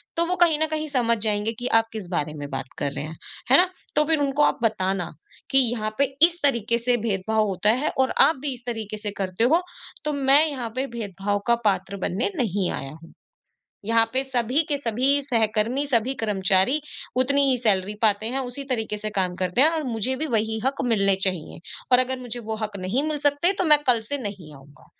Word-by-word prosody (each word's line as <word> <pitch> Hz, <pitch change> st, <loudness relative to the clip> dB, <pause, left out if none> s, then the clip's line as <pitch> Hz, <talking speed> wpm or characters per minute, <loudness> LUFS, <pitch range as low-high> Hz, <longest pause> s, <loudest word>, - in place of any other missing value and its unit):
तो 335 Hz, -, +1 dB
वो 360 Hz, +2 st, -1 dB
कहीं 320 Hz, -3 st, +3 dB
न 315 Hz, -, +2 dB
कहीं 310 Hz, 0 st, -2 dB
समझ 240 Hz, -5 st, +1 dB
जाएँगे 210 Hz, +1 st, 0 dB
कि 245 Hz, -, -3 dB
आप 225 Hz, -, -2 dB
किस 210 Hz, -5 st, -6 dB
बारे 155 Hz, -3 st, -2 dB
में 145 Hz, 0 st, -6 dB
बात 135 Hz, -1 st, -5 dB
कर 140 Hz, -, -1 dB
रहे 140 Hz, -, -5 dB
हैं। 160 Hz, +1 st, -8 dB, 0.4 s
है 270 Hz, -, +9 dB
ना? 365 Hz, -, +4 dB, 0.3 s
तो 300 Hz, -, +4 dB
फिर 315 Hz, -1 st, +1 dB
उनको 285 Hz, +1 st, +1 dB
आप -, -, +2 dB
बताना, 190 Hz, -5 st, 0 dB, 0.4 s
कि 270 Hz, -, +4 dB, 0.2 s
यहाँ 215 Hz, -2 st, -3 dB
पे 280 Hz, -, +4 dB, 0.2 s
इस 345 Hz, 0 st, -2 dB
तरीके 235 Hz, -4 st, +1 dB
से 240 Hz, +1 st, +1 dB
भेदभाव 215 Hz, 0 st, 0 dB
होता 195 Hz, +2 st, 0 dB
है 305 Hz, -, -1 dB
और 260 Hz, -, +2 dB
आप 320 Hz, -, +5 dB
भी 285 Hz, -2 st, -2 dB
इस 245 Hz, -1 st, -11 dB
तरीके 220 Hz, -3 st, -4 dB
से 210 Hz, -1 st, -4 dB
करते 190 Hz, +2 st, -1 dB
हो, 320 Hz, +9 st, +4 dB, 0.4 s
तो 300 Hz, -, 0 dB
मैं 280 Hz, +2 st, +4 dB
यहाँ 255 Hz, -6 st, -4 dB
पे 265 Hz, +1 st, -1 dB
भेदभाव 205 Hz, 0 st, -2 dB
का 235 Hz, -, +5 dB
पात्र 195 Hz, 0 st, 0 dB
बनने 210 Hz, -, -1 dB
नहीं 200 Hz, -7 st, 0 dB
आया 135 Hz, 0 st, -5 dB
हूँ। 165 Hz, -, -15 dB, 0.7 s
यहाँ 230 Hz, 0 st, +4 dB
पे 260 Hz, -, +2 dB
सभी 255 Hz, +2 st, 0 dB
के 290 Hz, -, +1 dB
सभी 270 Hz, +3 st, +1 dB
सहकर्मी, 230 Hz, +1 st, 0 dB
सभी 250 Hz, 0 st, +1 dB
कर्मचारी 195 Hz, +4 st, +1 dB, 0.4 s
उतनी 280 Hz, +2 st, +4 dB
ही 260 Hz, -, +3 dB
सैलरी 205 Hz, -4 st, +1 dB
पाते 215 Hz, -1 st, +2 dB
हैं, 265 Hz, +2 st, -2 dB
उसी 260 Hz, +1 st, -5 dB
तरीके 220 Hz, -4 st, -1 dB
से 215 Hz, +1 st, -4 dB
काम 185 Hz, -2 st, 0 dB
करते 185 Hz, +7 st, 0 dB
हैं 310 Hz, -, +6 dB
और 320 Hz, -2 st, -2 dB
मुझे 245 Hz, +1 st, -1 dB
भी 310 Hz, -, -3 dB
वही 220 Hz, -3 st, 0 dB
हक 270 Hz, +1 st, -1 dB
मिलने 195 Hz, -4 st, +3 dB
चाहिए। 185 Hz, -5 st, -2 dB, 0.3 s
और 250 Hz, -, +7 dB
अगर 255 Hz, 0 st, -1 dB
मुझे 245 Hz, -1 st, -6 dB
वो 220 Hz, -1 st, -5 dB
हक 215 Hz, -2 st, -5 dB
नहीं 195 Hz, +10 st, -1 dB
मिल 305 Hz, -, -2 dB
सकते, 290 Hz, +6 st, +2 dB
तो 375 Hz, -, -1 dB
मैं 300 Hz, -3 st, +5 dB
कल 240 Hz, -2 st, +4 dB
से 285 Hz, -, -1 dB
नहीं 200 Hz, -, -7 dB
आऊँगा। 140 Hz, +1 st, -18 dB
230 Hz, 220 wpm, -24 LUFS, 205-275 Hz, 0.7 s, है